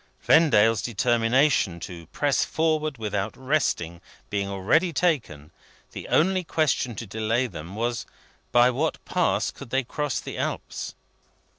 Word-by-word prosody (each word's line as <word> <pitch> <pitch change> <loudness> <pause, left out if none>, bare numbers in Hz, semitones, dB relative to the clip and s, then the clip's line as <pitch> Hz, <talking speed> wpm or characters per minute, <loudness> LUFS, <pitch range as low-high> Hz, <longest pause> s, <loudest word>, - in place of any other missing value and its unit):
Vendale's 115 -9 +5
determination 120 - +2
to 85 -3 -8
press 145 - +1
forward, 155 -3 0
without 105 -3 -3
resting, 125 - -1 0.3
being 100 -1 -1
already 110 - +2
taken, 130 - -1 0.4
the - - -8
only 185 +3 +2
question 155 -7 0
to 115 - -6
delay 110 +4 0
them 85 -3 -8
was 120 +1 -2 0.4
by 120 +1 +5
what 150 +6 -1
Pass - - +1
could - - -11
they 135 +3 +1
cross 145 +3 -2
the - - -7
Alps? - - -4
120 Hz, 130 wpm, -25 LUFS, 100-150 Hz, 0.4 s, Vendale's